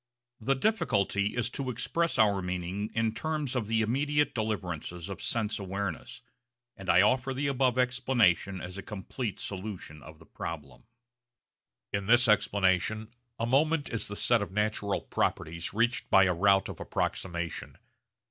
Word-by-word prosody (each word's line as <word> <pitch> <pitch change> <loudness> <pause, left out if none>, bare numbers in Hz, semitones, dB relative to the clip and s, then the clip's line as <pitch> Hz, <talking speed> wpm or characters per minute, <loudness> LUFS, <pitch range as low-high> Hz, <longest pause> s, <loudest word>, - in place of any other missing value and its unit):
The 135 +4 +1
difficulty 105 - +1
is 120 0 0
to 135 0 -3
express 155 +8 -1
our 100 -4 +4
meaning 90 +3 -3
in 115 -1 +1
terms 150 +2 -2
of 115 -5 -1
the 115 0 +2
immediate 145 +6 +1
deliverances 90 -6 -3
of 100 - -6
sense 110 -2 -1
awareness, 95 -2 -4 0.5
and 95 -2 -8
I 95 - +6
offer 130 +4 +2
the 140 +2 -1
above 130 -2 +2
explanation 120 -7 +2
as 90 +2 -7
a - - -4
complete 105 +1 -5
solution 95 -6 -6
of 80 +2 -12
the 80 - -17
problem. 70 -6 -7 1.1
In 100 -1 -1
this 120 +2 +5
explanation 105 +1 +2 0.2
a 115 - -1
moment 145 +5 +2
is 115 -2 -1
the 105 - -5
set 120 +2 +3
of 100 - -4
natural 105 -1 0
properties 85 +2 -2
reached 115 +4 0
by 95 - +7
a 90 -1 +3
route 95 +2 +4
of - - -8
approximation. 85 -2 -3
105 Hz, 150 wpm, -29 LUFS, 95-125 Hz, 1.1 s, by